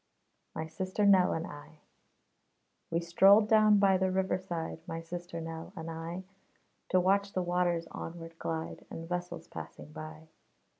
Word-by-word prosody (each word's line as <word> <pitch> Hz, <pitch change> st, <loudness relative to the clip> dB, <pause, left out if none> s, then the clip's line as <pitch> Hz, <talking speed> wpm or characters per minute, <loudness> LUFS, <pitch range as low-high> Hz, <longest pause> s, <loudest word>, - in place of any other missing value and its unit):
MY 160 Hz, -, -2 dB
SISTER 185 Hz, +6 st, -1 dB
NELL 190 Hz, -3 st, +6 dB
AND 165 Hz, +1 st, -2 dB
I 150 Hz, +2 st, -11 dB, 1.1 s
We 165 Hz, +1 st, 0 dB
strolled 195 Hz, +5 st, +6 dB
down 215 Hz, -1 st, +6 dB
by 195 Hz, -1 st, +5 dB
the 190 Hz, 0 st, +2 dB
river 190 Hz, 0 st, +1 dB
side, 170 Hz, -4 st, -4 dB
My 165 Hz, -, -4 dB
sister 170 Hz, +1 st, -6 dB
Nell 165 Hz, 0 st, -6 dB
and 165 Hz, 0 st, -5 dB
I, 165 Hz, +3 st, -5 dB, 0.7 s
To 185 Hz, -, +4 dB
watch 200 Hz, +2 st, +2 dB
the 185 Hz, -, 0 dB
waters 175 Hz, -1 st, +1 dB
onward 165 Hz, 0 st, -8 dB
glide, 160 Hz, 0 st, -4 dB
And 165 Hz, 0 st, -7 dB
vessels 180 Hz, 0 st, -4 dB
passing 150 Hz, -, -9 dB
by. 155 Hz, +1 st, -9 dB
175 Hz, 150 wpm, -31 LUFS, 165-190 Hz, 1.1 s, NELL